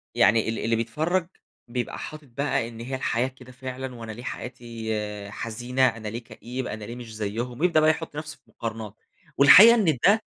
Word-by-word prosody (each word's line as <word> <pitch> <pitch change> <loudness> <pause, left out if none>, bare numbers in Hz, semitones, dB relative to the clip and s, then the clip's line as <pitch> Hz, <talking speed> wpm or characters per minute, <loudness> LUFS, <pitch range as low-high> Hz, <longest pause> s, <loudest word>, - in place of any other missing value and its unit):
يعني 110 +2 +4
ال 115 - -2
ال - - -4
اللي 115 +1 +2
بيتفرَّج 160 +10 0 0.4
بيبقى 120 0 -3
حاطِط 155 -2 -8
بقى 120 -1 -1
إن 115 -1 -10
هي 130 +3 -4
الحياة 125 -1 0
كده 130 -1 -13
فعلًا، 130 0 -6
وأنا 115 -1 -7
ليه 120 +3 -9
حياتي 110 -5 -5
حزينة، 120 +4 0
أنا 110 -2 -4
ليه 115 +3 -5
كئيب، 125 +3 -6
أنا 105 0 -6
ليه 120 - -7
مش 115 -3 -9
زيهُم، 115 +4 -3
بيبدأ 170 -2 +4
بقى 155 0 +5
يحُط 160 -1 -2
نفسه 155 +1 -6
في - - -41
مقارنات. 110 -2 -6 0.4
والحقيقة 210 +12 +10
إن 165 - +2
ده 215 +2 +5
120 Hz, 190 wpm, -25 LUFS, 115-140 Hz, 0.4 s, والحقيقة